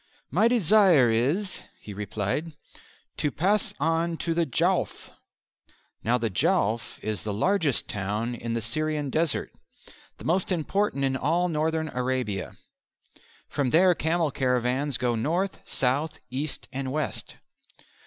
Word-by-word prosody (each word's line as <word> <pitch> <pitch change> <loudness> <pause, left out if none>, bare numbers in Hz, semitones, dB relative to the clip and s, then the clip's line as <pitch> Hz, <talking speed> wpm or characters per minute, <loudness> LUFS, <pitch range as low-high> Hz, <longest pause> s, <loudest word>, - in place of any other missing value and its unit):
"My 200 - +4
desire 195 - +5
is," 150 - 0 0.2
he 105 - -9
replied, 105 - -3 0.6
"to 150 - +1
pass 190 +9 +1
on 165 +2 +1
to 165 - -1
the 165 -1 +1
Jowf." 130 - 0 0.9
Now 120 +2 +2
the 115 -2 -1
Jowf 115 - +1
is 105 -4 -2
the 105 - -2
largest 155 - +1
town 105 +4 -2
in 115 -1 -4
the 115 - -1
Syrian 150 +4 -1
desert 160 +1 0 0.7
the - - -11
most 185 +4 +1
important 180 -2 0
in 135 -1 0
all 170 +7 +1
Northern 160 0 0
Arabia. 125 -6 -2 0.9
From 140 -3 -1
there 180 +6 +5
camel 160 -1 0
caravans 125 +1 0
go 120 -1 0
north, 170 - -1
south, 140 +5 0
east, 140 +3 -3
and 130 0 -3
west. 150 +2 -3
145 Hz, 130 wpm, -26 LUFS, 120-165 Hz, 0.9 s, desire